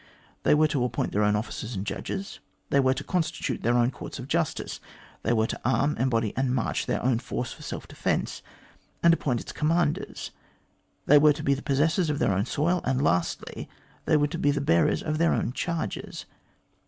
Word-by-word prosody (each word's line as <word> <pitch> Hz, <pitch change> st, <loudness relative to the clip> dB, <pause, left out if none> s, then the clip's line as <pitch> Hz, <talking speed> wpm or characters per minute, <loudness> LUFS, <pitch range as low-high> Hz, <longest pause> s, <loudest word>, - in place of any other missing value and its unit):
They -, -, +4 dB
were 155 Hz, +1 st, +4 dB
to 140 Hz, -4 st, 0 dB
appoint 120 Hz, -2 st, -1 dB
their 105 Hz, -, +1 dB
own 105 Hz, 0 st, +3 dB
officers 110 Hz, +2 st, -4 dB
and 95 Hz, +1 st, -3 dB
judges; 195 Hz, -, -5 dB, 0.3 s
they 140 Hz, -, +4 dB
were 130 Hz, -1 st, +3 dB
to -, -, -4 dB
constitute 165 Hz, -3 st, -2 dB
their 120 Hz, +2 st, +2 dB
own 120 Hz, +1 st, +3 dB
courts -, -, -8 dB
of -, -, -7 dB
justice; -, -, -1 dB, 0.4 s
they 115 Hz, -, 0 dB
were 110 Hz, -2 st, +3 dB
to -, -, -5 dB
arm, 130 Hz, +4 st, +2 dB
embody, 115 Hz, -4 st, +1 dB
and 130 Hz, -1 st, +1 dB
march 120 Hz, -, -1 dB
their -, -, -1 dB
own 125 Hz, -2 st, +2 dB
force -, -, -4 dB
for -, -, -15 dB
self -, -, -6 dB
defence, -, -, -2 dB, 0.6 s
and 170 Hz, 0 st, +7 dB
appoint 125 Hz, -7 st, 0 dB
its -, -, -8 dB
commanders; 160 Hz, 0 st, -1 dB, 0.7 s
they 145 Hz, +1 st, +7 dB
were 150 Hz, 0 st, +6 dB
to 150 Hz, +1 st, -7 dB
be 140 Hz, -, +3 dB
the 140 Hz, -, -3 dB
possessors 155 Hz, +4 st, +1 dB
of 150 Hz, -, 0 dB
their 100 Hz, -, +2 dB
own 95 Hz, +2 st, 0 dB
soil, 170 Hz, +4 st, +1 dB
and, 130 Hz, -1 st, 0 dB
lastly, 90 Hz, -, -1 dB, 0.4 s
they 155 Hz, -, +4 dB
were 145 Hz, -, +3 dB
to 165 Hz, +3 st, -4 dB
be 145 Hz, -, +2 dB
the 145 Hz, 0 st, +1 dB
bearers 85 Hz, -12 st, +2 dB
of 155 Hz, -1 st, -2 dB
their 170 Hz, 0 st, +3 dB
own 125 Hz, -, -1 dB
charges. 165 Hz, -, -4 dB
140 Hz, 205 wpm, -27 LUFS, 120-155 Hz, 0.7 s, and